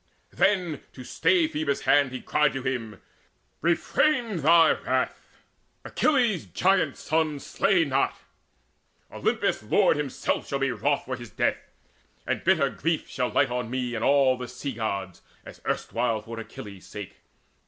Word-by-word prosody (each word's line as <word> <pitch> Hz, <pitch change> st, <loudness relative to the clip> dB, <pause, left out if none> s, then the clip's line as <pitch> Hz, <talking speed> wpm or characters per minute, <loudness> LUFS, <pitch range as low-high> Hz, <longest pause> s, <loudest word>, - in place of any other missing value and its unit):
Then, 185 Hz, -6 st, +1 dB
to 130 Hz, -, -10 dB
stay 165 Hz, +5 st, +2 dB
Phoebus' 150 Hz, -2 st, -2 dB
hand, 140 Hz, -2 st, +3 dB
he 130 Hz, -, -6 dB
cried 150 Hz, -1 st, +2 dB
to 135 Hz, -1 st, -4 dB
him: 115 Hz, -6 st, -3 dB, 0.6 s
"Refrain 230 Hz, -, +1 dB
thy 165 Hz, +2 st, +6 dB
wrath: -, -, -1 dB, 0.6 s
Achilles' 235 Hz, -, +1 dB
giant 155 Hz, -, +1 dB
son 155 Hz, -2 st, 0 dB
Slay 180 Hz, +4 st, +1 dB
not! 135 Hz, -1 st, 0 dB, 0.9 s
Olympus' -, -, 0 dB
Lord -, -, +3 dB
himself 145 Hz, -3 st, -2 dB
shall 140 Hz, -, -1 dB
be 135 Hz, -1 st, 0 dB
Wroth 140 Hz, +6 st, 0 dB
for 130 Hz, -, -3 dB
his 120 Hz, -2 st, -10 dB
death, -, -, 0 dB, 0.7 s
and -, -, -2 dB
bitter -, -, +3 dB
grief 165 Hz, -1 st, -1 dB
shall 125 Hz, -2 st, -2 dB
light 135 Hz, -2 st, +2 dB
On 125 Hz, -2 st, -2 dB
me 125 Hz, -1 st, -2 dB
and 115 Hz, -1 st, -3 dB
all 135 Hz, -2 st, +4 dB
the 125 Hz, -, -5 dB
Sea 125 Hz, +3 st, -5 dB
gods, 100 Hz, -5 st, -4 dB, 0.2 s
as -, -, -12 dB
erstwhile 115 Hz, -2 st, -1 dB
For 115 Hz, 0 st, -7 dB
Achilles' 100 Hz, -3 st, -10 dB
sake. 105 Hz, -3 st, -8 dB
135 Hz, 145 wpm, -26 LUFS, 120-160 Hz, 0.9 s, thy